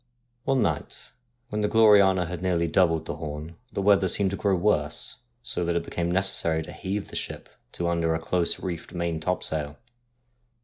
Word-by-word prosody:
One 135 -3 +2
night, 75 -3 -3 0.4
when 105 0 -2
the 105 - +2
Gloriana 100 -5 +5
had 90 0 -6
nearly 90 -2 +1
doubled 80 -1 +2
the - - -5
Horn, 75 +2 -6
the 100 - -2
weather 100 -1 +5
seemed 95 +1 +3
to - - -2
grow 100 -1 +1
worse, 85 -5 0 0.3
so 85 - -2
that 85 0 0
it 85 - 0
became 85 0 -3
necessary 85 -3 +1
to - - -9
heave 100 +2 -4
the - - -9
ship - - -4 0.3
to 85 - -2
under 85 -1 +1
a - - -2
close 85 +1 0
reefed 85 -4 -5
main 85 -2 -1
topsail. 80 -4 -2
85 Hz, 180 wpm, -26 LUFS, 80-95 Hz, 0.4 s, Gloriana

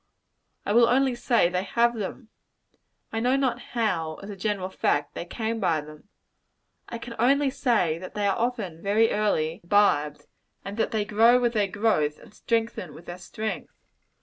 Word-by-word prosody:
I 205 - 0
will 235 +1 +6
only 265 +1 +3
say 240 -5 +2
they 180 +1 -1
have 235 +4 +2
them. 220 +2 -6 0.8
I 225 - 0
know 250 +3 +2
not 270 -2 0 0.2
how, 165 -9 0
as 205 - -7
a - - -7
general 195 -1 -2
fact, 145 -5 0
they - - -5
came 225 +4 -3
by 170 -6 +1
them. 150 +5 -14 0.8
I 235 - -5
can 235 +1 -8
only 275 +3 +3
say 210 - +1
that 185 - -9
they 205 -1 -1
are 200 - +2
often 220 -9 -3
very 215 +3 +3
early 175 -5 0
imbibed; 170 -6 +2 0.4
and 200 +1 -5
that - - +1
they 215 -2 -1
grow 225 +4 +5
with 240 -1 +1
their 210 -3 +2
growth, 185 -7 +1
and - - -17
strengthen 230 +1 -2
with 170 - -13
their 175 +1 -8
strength. 215 +3 -5
210 Hz, 175 wpm, -26 LUFS, 180-235 Hz, 0.8 s, will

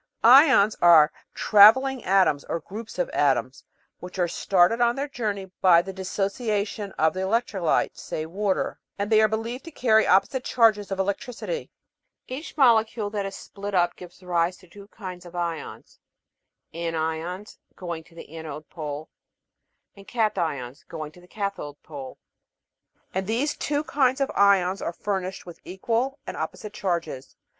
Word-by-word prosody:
Ions 250 -4 +7
are 165 -3 +7 0.2
travelling 250 +6 +6
atoms, 185 -6 +3
or 170 - -3
groups 215 +5 -9
of 180 - 0
atoms, 130 -2 0 0.3
which 180 +1 -9
are 175 -1 +2
started 190 +6 +2
on 240 0 +3
their 280 +2 -3
journey 205 -8 -4
by 175 -2 +6
the 195 +1 -7
dissociation 200 +2 -2
of 160 0 +2
the 185 - -5
electrolyte 190 -3 0
(say, 155 - -4
water), 190 +3 -2 0.2
and 205 +2 -3
they 215 0 +6
are 215 - +5
believed 225 +4 -4
to - - -7
carry 220 -8 +3
opposite 250 +7 +3
charges 220 -4 +3
of 195 - -3
electricity. 240 - -3 0.6
Each 285 +6 -7
molecule 225 -5 +3
that 205 -2 -2
is 195 - -7
split 200 0 -7
up 175 -1 +2
gives 180 +1 -13
rise 175 0 0
to 185 - -19
two 200 +3 -14
kinds 185 -4 -9
of 175 0 -13
ions 170 -2 -5 0.7
(anions, 165 +3 -4 0.2
going 170 -3 -6
to 165 - -21
the 165 -1 -11
anode 155 -2 -8
pole, 150 -2 -6 0.9
and 200 -1 -15
cations, 165 - -2
going 155 -2 -7
to 180 - -17
the 180 - -18
cathode 200 -8 -5
pole); 140 -4 -9 1.0
and 190 0 -2
these 245 +7 0
two 290 0 -1
kinds 265 -3 +1
of 275 - 0
ions 195 -1 +3
are 170 - -3
furnished 190 -1 -4
with 175 -2 -11
equal 230 +9 -2
and - - -6
opposite 210 -1 -5
charges. 170 -8 -3
195 Hz, 155 wpm, -25 LUFS, 170-220 Hz, 1.0 s, Ions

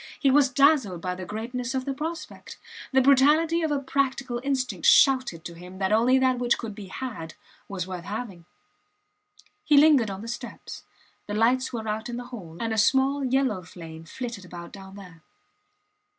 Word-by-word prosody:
He 275 -3 +3
was 280 -1 +4
dazzled 265 - +3
by 180 +1 -3
the 185 0 -8
greatness 240 +4 -4
of 260 -1 -2
the 275 - -2
prospect; 310 +2 -7 0.3
the 265 -1 +4
brutality 300 +5 +4
of 320 - 0
a 295 - +1
practical 265 -2 -1
instinct 255 - -1
shouted 260 - +4
to 170 - -6
him 180 +2 -11
that 190 0 -1
only 235 +4 +4
that 260 -1 +2
which 245 -1 +1
could 225 -3 -6
be 200 -1 -9
had 185 -7 -7 0.3
was 190 -3 -4
worth 180 -2 -7
having. 200 -5 -6 1.2
He 295 - +4
lingered 285 -7 +6
on 195 +1 -6
the - - -8
steps. 235 - -8 0.4
The 205 - -3
lights 245 +4 +2
were 225 -3 -5
out 215 +2 -3
in 240 - -4
the 245 - -6
hall, 170 -8 -9
and 225 -1 -2
a 220 - +1
small 270 +5 +2
yellow 260 -6 +1
flame 165 -2 -11
flitted 235 +2 -6
about 175 -1 -10
down 195 -1 -11
there. 180 -5 -13
240 Hz, 180 wpm, -26 LUFS, 190-265 Hz, 1.2 s, lingered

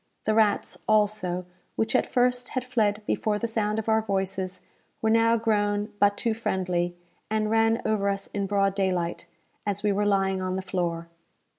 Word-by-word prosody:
The 215 - +2
rats, 215 -2 +2
also, 210 -4 +1 0.3
which 220 -1 0
at - - +1
first 250 0 +1
had 255 -1 -3
fled 215 -4 0
before 210 0 0
the 230 - -2
sound 220 -2 -1
of 220 - -3
our 220 0 +3
voices, 190 -2 -2 0.4
were 220 - +1
now 230 +1 +4
grown 210 -1 0
but 205 0 +4
too 230 -2 0
friendly, 180 -5 -1 0.3
and 215 0 0
ran 225 +1 +3
over 210 -2 +1
us 195 0 -2
in 200 -1 -1
broad 195 -1 +2
daylight, 185 -3 -1 0.4
as 205 0 -2
we 210 - +3
were 205 +1 +1
lying 195 -1 +1
on 185 0 -2
the 190 - -3
floor. 170 -3 -2
205 Hz, 175 wpm, -26 LUFS, 190-220 Hz, 0.4 s, now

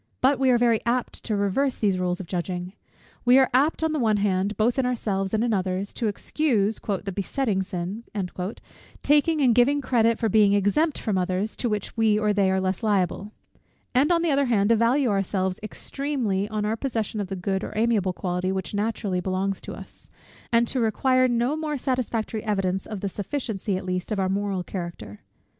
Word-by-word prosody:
But 265 +1 +3
we 265 -1 +3
are 245 - +5
very 235 -2 +3
apt 240 +1 -1
to 215 - 0
reverse 205 +7 +1
these 195 -4 0
rules 180 -1 -1
of 190 - -6
judging: 180 +1 -4 0.5
we 250 +1 +6
are 265 -1 +4
very 260 +3 +6
apt, 320 +1 -3
on 320 - +1
the 305 - -1
one 220 -4 +2
hand, 200 0 0
both 235 +4 +2
in 260 - +2
ourselves 195 -6 -1
and 220 0 +1
in 235 -2 +1
others, 190 0 -1
to 230 - -1
excuse 215 -1 0
"the 195 -1 -3
besetting 200 +2 -1
sin," 185 +4 -4 1.0
taking 295 +2 +3
and 250 -4 +5
giving 255 +5 +4
credit 230 -4 +2
for 225 - 0
being 210 -1 +4
exempt 205 - +2
from 205 -5 -1
others, 185 +4 -1
to 240 - -1
which 210 -2 -3
we 220 -2 +3
or 210 -1 +1
they 200 -2 +2
are 190 0 +2
less 185 0 -1
liable; 205 -1 0 0.6
and 270 +6 +3
on 340 -1 +3
the 335 - +2
other 280 0 +3
hand, 210 -4 +2
to 230 - +6
value 240 +4 +2
ourselves 190 -2 0
extremely 215 -3 -2
on 215 -1 -2
our 215 +1 0
possession 225 -4 -3
of 200 - -4
the 195 - -4
good 190 +1 -2
or - - -5
amiable 215 -4 +2
quality 180 0 -2
which 190 0 -3
naturally 205 -3 -1
belongs 190 +1 -2
to - - -7
us, - - -11 0.4
and 235 0 +4
to 260 - -1
require 255 +3 +3
no 240 +4 +1
more 310 -2 -2
satisfactory 240 -4 -2
evidence 195 -3 -1
of 210 -3 -6
the 200 - -1
sufficiency 205 -2 -3
at 185 - -6
least 180 +2 -3
of 210 - 0
our 190 -1 +1
moral 195 -1 -1
character. 170 - -7
210 Hz, 200 wpm, -25 LUFS, 190-245 Hz, 1.0 s, we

